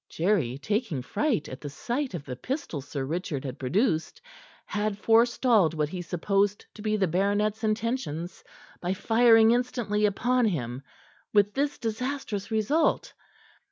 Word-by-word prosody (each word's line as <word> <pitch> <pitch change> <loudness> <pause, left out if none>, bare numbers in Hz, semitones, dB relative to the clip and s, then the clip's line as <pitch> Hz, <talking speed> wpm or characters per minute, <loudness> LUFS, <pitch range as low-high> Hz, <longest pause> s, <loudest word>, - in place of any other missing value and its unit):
Jerry, 160 - 0
taking 205 - -2
fright 245 - 0
at 130 - -8
the 145 - -5
sight 245 - -3
of 150 -4 -6
the 125 - -5
pistol 255 - -4
Sir 140 0 -4
Richard 155 -2 -3
had 130 +1 -6
produced, 160 - 0 0.5
had 210 -1 -2
forestalled 225 -5 +3
what 150 -1 0
he 180 +2 -5
supposed 195 +4 0
to 215 - -11
be 215 0 0
the 190 -2 +2
baronet's 205 +5 0
intentions 215 - -2 0.4
by 180 +2 -1
firing 225 +1 +5
instantly 235 -4 +1
upon 245 +5 +1
him, 130 - -2 0.5
with 205 -1 +4
this 285 +1 -1
disastrous 225 -3 -3
result. 230 +9 +1
205 Hz, 140 wpm, -27 LUFS, 165-230 Hz, 0.5 s, firing